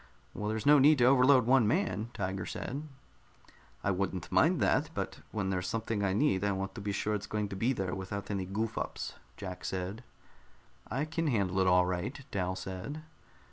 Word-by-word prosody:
"Well, 105 Hz, 0 st, -3 dB
there's 110 Hz, 0 st, -2 dB
no 145 Hz, 0 st, +7 dB
need 150 Hz, +3 st, +6 dB
to 125 Hz, -, +3 dB
overload 130 Hz, -1 st, +6 dB
one 125 Hz, -3 st, +5 dB
man," 115 Hz, -, 0 dB
Tiger 95 Hz, -1 st, -3 dB
said. 145 Hz, +5 st, -5 dB, 1.0 s
"I 100 Hz, -, +2 dB
wouldn't 95 Hz, -2 st, -2 dB
mind -, -, +4 dB
that. -, -, +2 dB
But -, -, -3 dB
when 95 Hz, -3 st, -1 dB
there's 90 Hz, -1 st, -1 dB
something 110 Hz, -1 st, -2 dB
I 95 Hz, -, +2 dB
need, 100 Hz, -4 st, +2 dB
I 100 Hz, -1 st, +2 dB
want 95 Hz, 0 st, -3 dB
to 115 Hz, -, -7 dB
be 100 Hz, 0 st, -2 dB
sure 105 Hz, +2 st, -1 dB
it's 105 Hz, -1 st, -3 dB
going 105 Hz, -1 st, -2 dB
to 100 Hz, -, -5 dB
be 115 Hz, +7 st, +1 dB
there 95 Hz, -7 st, -2 dB
without 100 Hz, +2 st, -5 dB
any 95 Hz, -2 st, -2 dB
goof 110 Hz, +3 st, -2 dB
ups," -, -, -4 dB, 0.2 s
Jack 90 Hz, -2 st, -7 dB
said. 95 Hz, +5 st, -4 dB, 0.9 s
"I 135 Hz, +4 st, -1 dB
can 165 Hz, +1 st, -2 dB
handle 100 Hz, -8 st, +1 dB
it 95 Hz, -, +3 dB
all 90 Hz, 0 st, +5 dB
right," 90 Hz, +10 st, -3 dB
Dal 95 Hz, -2 st, -1 dB
said. 95 Hz, +12 st, -6 dB
100 Hz, 195 wpm, -31 LUFS, 95-125 Hz, 1.0 s, no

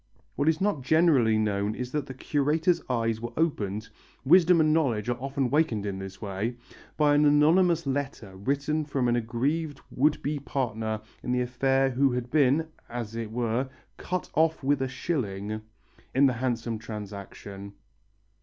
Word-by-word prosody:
What 145 Hz, +2 st, +2 dB
is 160 Hz, 0 st, +1 dB
not 195 Hz, -8 st, 0 dB
generally 135 Hz, -6 st, +4 dB
known 105 Hz, 0 st, 0 dB
is 125 Hz, 0 st, -5 dB
that 150 Hz, -1 st, -2 dB
the 130 Hz, -, -7 dB
curator's 155 Hz, +6 st, +1 dB
eyes 115 Hz, -2 st, 0 dB
were 120 Hz, 0 st, -5 dB
opened 110 Hz, -, -1 dB, 0.4 s
wisdom 175 Hz, +3 st, +6 dB
and 155 Hz, -1 st, +4 dB
knowledge 125 Hz, -9 st, +1 dB
are 120 Hz, -, 0 dB
often 135 Hz, -2 st, -1 dB
wakened 140 Hz, -9 st, +1 dB
in 100 Hz, -1 st, -3 dB
this 95 Hz, 0 st, -8 dB
way! 105 Hz, +3 st, -3 dB, 0.4 s
by 150 Hz, -1 st, +4 dB
an 145 Hz, +1 st, +4 dB
anonymous 160 Hz, +3 st, +4 dB
letter 135 Hz, -8 st, -3 dB
written 140 Hz, +9 st, -1 dB
from 140 Hz, -4 st, -1 dB
an 120 Hz, -, +2 dB
aggrieved 135 Hz, +6 st, -1 dB
would 150 Hz, +3 st, +2 dB
be 145 Hz, +1 st, -1 dB
partner 110 Hz, -6 st, -2 dB, 0.2 s
in 125 Hz, -, -3 dB
the 125 Hz, -, +1 dB
affair 135 Hz, +2 st, +1 dB
who 135 Hz, +1 st, +2 dB
had 125 Hz, 0 st, -3 dB
been, 150 Hz, +2 st, +3 dB, 0.2 s
as 115 Hz, -2 st, -5 dB
it 115 Hz, -2 st, -4 dB
were, 120 Hz, +2 st, -1 dB, 0.3 s
"cut 180 Hz, 0 st, -3 dB
off 160 Hz, -1 st, +2 dB
with 140 Hz, 0 st, +2 dB
a 130 Hz, -, +1 dB
shilling" 110 Hz, -, -3 dB, 0.5 s
in 140 Hz, +2 st, +6 dB
the 130 Hz, -, +4 dB
handsome 115 Hz, -2 st, -2 dB
transaction. 100 Hz, -2 st, -8 dB
130 Hz, 165 wpm, -27 LUFS, 110-150 Hz, 0.5 s, wisdom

